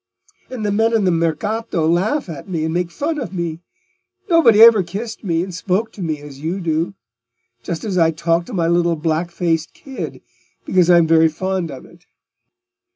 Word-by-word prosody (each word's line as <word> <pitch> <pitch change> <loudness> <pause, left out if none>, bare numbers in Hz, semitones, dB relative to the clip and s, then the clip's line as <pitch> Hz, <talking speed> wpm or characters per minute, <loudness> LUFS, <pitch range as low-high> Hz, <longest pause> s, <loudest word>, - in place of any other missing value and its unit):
And 245 -5 -5
the 205 - 0
men 225 +3 +2
in 220 - +2
the 180 - +3
Mercato 170 +2 -1
laugh 195 - +1
at 160 +1 -8
me 165 -3 -2
and 160 - -2
make 175 0 -1
fun 295 - -3
of 240 -10 -5
me. 170 -3 -4 0.7
Nobody 245 -11 +5
ever 225 -2 +8
kissed 205 +7 -6
me 170 -3 0
and 185 0 -7
spoke 195 +5 -1
to 200 - -11
me 160 -3 -2
as 145 -2 -11
you 165 +6 -3
do; 165 +1 -1 0.7
just 160 +8 -5
as 195 -5 -1
I 165 -1 +4
talk 165 +1 0
to - - -9
my 170 -4 0
little 170 0 +2
black 160 +2 -1
faced 165 -2 -2
kid, 270 -2 -8 0.4
because 180 -2 +2
I'm 170 -2 +6
very 160 0 +5
fond 185 +1 -3
of 135 -3 -9
it." 170 +1 -20
175 Hz, 190 wpm, -19 LUFS, 165-205 Hz, 0.7 s, ever